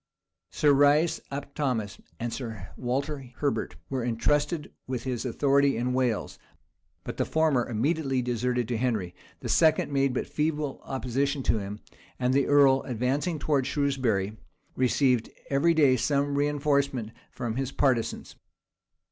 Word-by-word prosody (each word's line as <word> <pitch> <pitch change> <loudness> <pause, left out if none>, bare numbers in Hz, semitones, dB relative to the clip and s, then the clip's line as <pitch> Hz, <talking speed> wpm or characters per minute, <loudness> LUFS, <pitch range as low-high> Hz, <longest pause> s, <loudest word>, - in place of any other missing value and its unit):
Sir 145 -1 +3
Rice 145 +4 +4
ap 140 0 -6
Thomas 115 - -2 0.2
and 120 0 -3
Sir 110 -7 -6
Walter 135 +3 -2
Herbert 145 -2 -2
were 130 -3 -2
intrusted 145 +7 0
with 125 -2 -3
his 125 -3 -3
authority 140 +3 +2
in 125 +2 -1
Wales; 125 -4 -1 0.6
but - - -6
the - - +2
former 155 -7 +1
immediately 135 +2 0
deserted 125 0 -1
to 120 - 0
Henry; 110 -8 -1 0.3
the - - -5
second 160 -2 +3
made 135 -1 +2
but - - -1
feeble 150 -2 -2
opposition 135 +2 -1
to 110 - +2
him; 100 +1 -6 0.4
and 125 0 +1
the 140 0 +2
earl, 140 -2 +5
advancing 135 +7 -1
towards 145 -3 0
Shrewsbury, 125 -9 0 0.4
received 125 -2 +2 0.2
every 160 +5 +3
day 140 -5 +5
some 140 +2 +1
reënforcement 140 -5 0 0.2
from 120 -2 -4
his 135 -1 -2
partisans. 130 -6 0
135 Hz, 140 wpm, -27 LUFS, 120-145 Hz, 0.6 s, earl